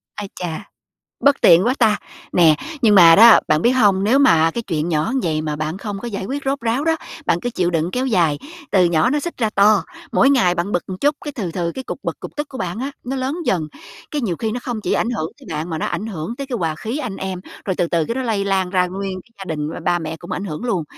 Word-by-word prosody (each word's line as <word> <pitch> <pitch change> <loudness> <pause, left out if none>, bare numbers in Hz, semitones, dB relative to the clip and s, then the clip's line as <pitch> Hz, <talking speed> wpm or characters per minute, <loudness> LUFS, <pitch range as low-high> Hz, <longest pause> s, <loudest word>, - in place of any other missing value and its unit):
Ai 205 -2 -6
chà, 170 -3 -6 0.5
bất 285 0 +3
tiện 170 +5 +6
quá 250 - +2
ta, 220 -3 +4 0.4
nè, 165 -3 +5 0.3
nhưng 215 -3 +5
mà 170 -4 +8
đó, 230 +2 +9
bạn 155 +1 +2
biết 240 - +4
hông, 205 -6 +3
nếu 240 +6 +4
mà 165 - +5
cái 235 - -4
chuyện 165 -6 -2
nhỏ 155 -2 0
như 265 - +1
vậy 155 -2 0
mà 150 -1 -3
bạn 155 +4 -3
không 205 0 -5
có 240 - -5
giải 200 -4 -4
quyết 275 +7 -4
rốt 275 +1 -1
ráo 235 +5 0
đó, 325 0 +2 0.3
bạn 170 - +2
cứ 245 - -3
chịu 180 -6 0
đựng 165 0 0
kéo 255 +1 -1
dài, 170 - +2 0.3
từ 185 -3 +4
nhỏ 170 +4 +2
nó 295 +2 +1
xích 340 +4 -5
ra 220 -3 +1
to, 205 0 +4 0.3
mỗi 270 - +4
ngày 215 -11 +3
bạn 175 +4 -2
bực 175 - +1
một 185 - -4
chút 290 +1 +2
cái 295 - -5
từ 210 -10 -4
từ 170 -1 -2
cái 260 - -7
cục - - -5
bực, - - -4
cục - - -9
tức 295 0 -3
của 260 - -9
bạn 180 +3 -3
á 270 +2 -3
nó 260 +2 -3
lớn 265 +4 -2
dần, 160 - 0 0.4
cái 300 - -2
nhiều 185 -7 -1
khi 220 +3 -2
nó 245 - -3
không 240 -4 -4
chỉ - - -2
ảnh 230 - +1
hưởng 170 -9 -3
tới - - -15
bạn 160 +3 -4
mà 160 - -3
nó - - -2
ảnh 215 - -3
hưởng 190 +1 -5
tới 275 - -5
cái 260 -3 -3
hòa 165 -4 -1
khí 225 - -4
anh 215 -10 -4
em, 190 -1 -4 0.2
rồi 190 - -1
từ 175 - +1
từ 165 -2 +1
cái 230 - -3
đó 260 - -2
lây 220 -5 -1
lan 190 -2 0
ra 180 -1 +2
nguyên 190 0 -5
cái 235 - -29
gia 195 - -7
đình 150 0 -3
với - - -7
ba 175 - +1
mẹ 160 -1 -5
cũng 170 - -9
ảnh 195 - -3
hưởng 170 +2 -5
luôn. 190 -10 -1
195 Hz, 285 wpm, -20 LUFS, 170-245 Hz, 0.5 s, đó